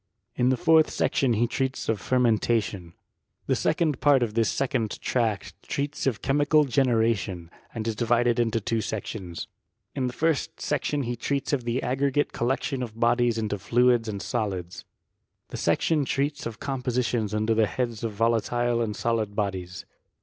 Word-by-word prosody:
In 125 +1 +2
the 130 - +2
fourth 160 -1 +5
section 130 -3 +1
he 115 +2 +2
treats 130 +2 -2
of 110 -4 0
fermentation. 110 -6 +1 0.5
Tlie - - +2
second 155 -6 0
part 140 -4 +5
of 110 -3 -2
this 115 -2 +2
second 125 -5 -1
tract 115 -5 -1
treats 145 0 -3
of 115 -7 -1
che 135 - +1
mical 145 +1 +4
generation, 115 -9 +1 0.2
and 115 -1 -4
is 115 - -1
divided 120 +1 +2
into 115 -1 +1
two 115 +1 -1
sections. 100 -5 -5 0.5
In 130 - -1
the 125 - -4
first 160 0 -1
section 145 0 -1
he 120 0 -2
treats 140 +4 -2
of 130 -4 0
the 120 +2 -1
aggregate 140 +3 0
coUectiou 130 +2 -1
of 115 -2 -6
bodies 120 0 +2
into 105 -2 -2
fluids 120 +1 +3
and 100 -2 -4
solids. 90 -4 -3 0.6
The - - -6
section 155 -3 +1
treats 140 +1 -1
of 115 -1 -8
compositions 125 -5 -1
under 110 +1 +1
the 110 -1 +3
heads 120 -3 -3
of 115 - -1
volatile 115 +2 +1
and 105 -2 -2
solid 110 -3 -1
bodies. 95 -3 -3
120 Hz, 165 wpm, -26 LUFS, 110-130 Hz, 0.6 s, fourth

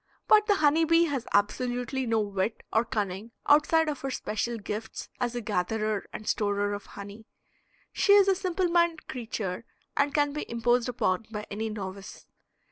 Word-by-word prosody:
But 425 -1 +6
the 410 - +4
honey 310 -1 +3
bee 330 +1 +4
has 275 -6 -3
absolutely 245 +5 0
no 225 -1 +2
wit 200 +1 -2
or 225 - +4
cunning 210 0 -3
outside 315 +2 +4
of 290 -4 -3
her 275 - -3
special 235 -1 -2
gifts 215 +1 -6
as 245 -1 -1
a 240 - -2
gatherer 215 +1 -1
and 215 - -8
storer 205 -1 0
of 205 - -6
honey. 205 +2 -10 0.7
She 405 - +4
is 400 -1 +7
a 390 - +5
simple 370 -1 -1
minded 340 -2 +1
creature, 225 -5 -4 0.3
and 285 0 +2
can 290 -1 +1
be 300 - -5
imposed 240 +1 +1
upon 215 -3 0
by 210 -1 -5
any 220 +2 -3
novice. 195 -2 -7
235 Hz, 170 wpm, -28 LUFS, 210-295 Hz, 0.7 s, is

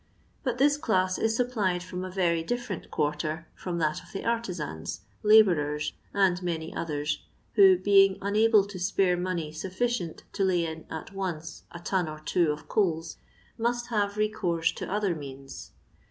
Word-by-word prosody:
But 250 -4 -1
this 290 +2 +4
class 185 -11 +1
is 225 0 +1
supplied 210 -8 0
from 180 0 -5
a 185 - -4
very 175 -3 +1
different 230 -1 -4
quarter 155 +2 -2
firom 175 -2 -4
that 155 -2 0
of 180 - -17
the 195 - -5
artisans, 175 - -3 0.2
la 215 +1 +8
bourers, 150 -5 -1 0.2
and 190 -3 +2
many 165 -2 -3
others, 150 -2 -2 0.3
who, 195 -3 +7
being 195 0 +5
unable 210 +1 +4
to 200 -2 -8
spare 180 0 +2
money 175 -3 -2
snfiicient 185 +2 -2
to 200 - 0
lay. 180 -3 +2
in 160 -1 -6
at 160 +4 -7
once 180 -5 -5
a 170 - -8
ton 180 -1 -1
or 155 - -6
two 160 +1 +1
of 150 - -7
coals, 165 -5 0 0.4
must 240 +1 -1
have 205 -2 0
recourse 180 -6 +1
to - - -6
other 205 -3 +1
means. 135 -3 -9
185 Hz, 165 wpm, -28 LUFS, 160-205 Hz, 0.4 s, la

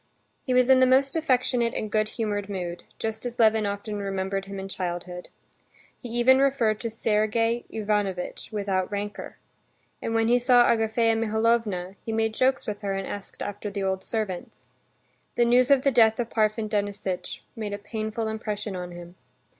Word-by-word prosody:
He - - 0
was 250 -1 +5
in 265 -1 +6
the 255 - +5
most 270 +2 +3
affectionate 255 -6 +1
and 215 - -3
good 215 0 +1
humored 205 -3 -2
mood, 175 -3 -4 0.2
just 220 -1 -4
as 245 -1 -4
Levin 220 -2 +4
often 205 +1 -4
remembered 195 0 -2
him 195 0 -7
in 190 - -5
childhood. 180 -1 -5 0.7
He 245 - -7
even 240 +3 +4
referred 260 -6 +2
to 230 - -3
Sergey 225 +2 0
Ivanovitch 205 -4 -2
without 195 -3 -1
rancor. 205 0 -5 0.6
When 225 0 0
he 245 +1 +4
saw 245 0 +5
Agafea 225 0 +2
Mihalovna, 220 -4 0
he 225 - -4
made 220 0 0
jokes 260 +3 +1
with 205 -1 -4
her 200 -1 -2
and 195 0 -3
asked 200 -1 -7
after 205 +1 -5
the 200 -1 -4
old 190 0 -1
servants. 210 -6 -4 0.7
The 240 - +3
news 245 +2 +4
of 275 -2 +5
the 275 - +3
death 225 -2 +4
of 235 -1 -2
Parfen 215 0 +1
Denisitch 205 -3 -3
made 215 -2 -4
a - - -2
painful 220 +1 -4
impression 215 -2 -4
on 180 -1 -6
him. 175 +1 -11
215 Hz, 170 wpm, -26 LUFS, 200-235 Hz, 0.7 s, in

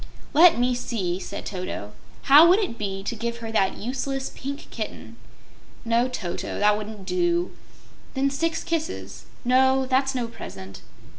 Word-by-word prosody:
"Let 330 +1 +7
me 250 +1 +2
see," 195 -7 -2
said 195 +2 -7
Toto. 180 - -5 0.3
"How 295 +5 +8
would 365 - +6
it 390 - -1
be 195 -2 -3
to 235 +4 -3
give 235 +1 -3
her 225 -1 -6
that 195 -3 +1
useless 270 +3 -3
Pink 280 +2 -6
Kitten?" - - -6 0.7
"No, 235 +2 +2
Toto; 190 -9 -4
that 210 0 +4
wouldn't 210 -2 -7
do." 345 - 0 0.6
"Then 275 +1 +1
six 325 +3 -1
kisses." 330 -2 -4 0.2
"No; 265 +1 +4
that's 265 +1 +1
no 245 -2 -1
present." 95 - -9
250 Hz, 150 wpm, -25 LUFS, 210-275 Hz, 0.7 s, How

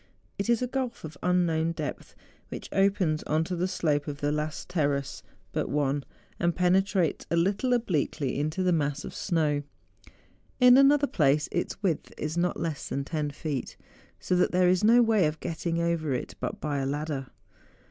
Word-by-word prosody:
It 200 - -2
is 235 +1 +3
a - - 0
gulf 255 -2 -3
of 155 -1 -7
an 180 - 0
unknown 165 -2 +2
depth, - - -6 0.3
which - - -7
opens 195 -5 +2
on 155 +1 +1
to 180 +2 -3
the 180 +2 0
slope 155 -6 0
of 145 -1 -5
the 145 0 0
last 150 0 -3
terrace 145 -6 -1 0.3
but - - -2
one, 140 0 0 0.4
and 175 0 +1
penetrates 185 -1 +1
a - - +1
little 195 +9 +1
obliquely 155 - 0
into 155 +5 -1
the 180 - +3
mass 145 -2 -1
of - - -7
snow: 155 -5 0 1.0
in 250 -1 +8
another 280 +2 +6
place 150 - +2
its 175 +3 -3
width 170 -6 -1
is 155 +1 -3
not 175 +1 0
less 160 -4 -3
than 140 - -2
10 150 -1 -2
feet, 145 -2 -5 0.4
so 180 - 0
that 180 - +3
there 180 0 +4
is 180 +1 +2
no 235 +3 +6
way 215 -7 +3
of 155 +1 -4
getting 165 +1 -2
over 170 -3 0
it 125 - -4
but 205 - -4
by 150 -5 -2
a 135 - -1
ladder. 145 -1 -3
165 Hz, 185 wpm, -28 LUFS, 150-185 Hz, 1.0 s, in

